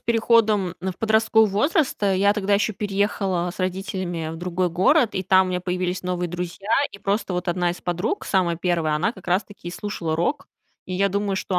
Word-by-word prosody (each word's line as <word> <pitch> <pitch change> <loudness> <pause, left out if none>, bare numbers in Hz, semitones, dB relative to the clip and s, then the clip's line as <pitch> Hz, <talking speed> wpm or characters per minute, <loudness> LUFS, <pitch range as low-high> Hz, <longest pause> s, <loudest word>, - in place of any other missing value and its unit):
переходом 220 -5 +2
в 185 +1 -2
подростковый 220 0 +3
возраст, 285 - +1
э, 195 -2 +2
я 200 +2 +4
тогда 205 -1 +1
ещё 210 +2 +1
переехала 195 -3 -1
с - - -15
родителями 185 -3 -3
в - - -7
другой 180 +1 -1
город, 220 - +3
и 190 - -1
там 190 0 +4
у - - -3
меня 180 0 -1
появились 180 0 -2
новые 180 -1 -2
друзья. 180 +3 -6 0.2
И - - -11
просто 200 0 -1
вот 180 +1 -2
одна 175 0 +1
из 175 - -7
подруг, 175 - -2
самая 175 -4 +1
первая, 170 -3 0
она 155 +8 0
как 190 -6 -15
раз-таки 185 0 -2
и - - -5
слушала 180 -5 -3
рок. 175 - -1 0.4
И 185 - -4
я 200 +2 +2
думаю, 200 0 -1
что 185 -1 -1
190 Hz, 200 wpm, -23 LUFS, 180-205 Hz, 0.4 s, я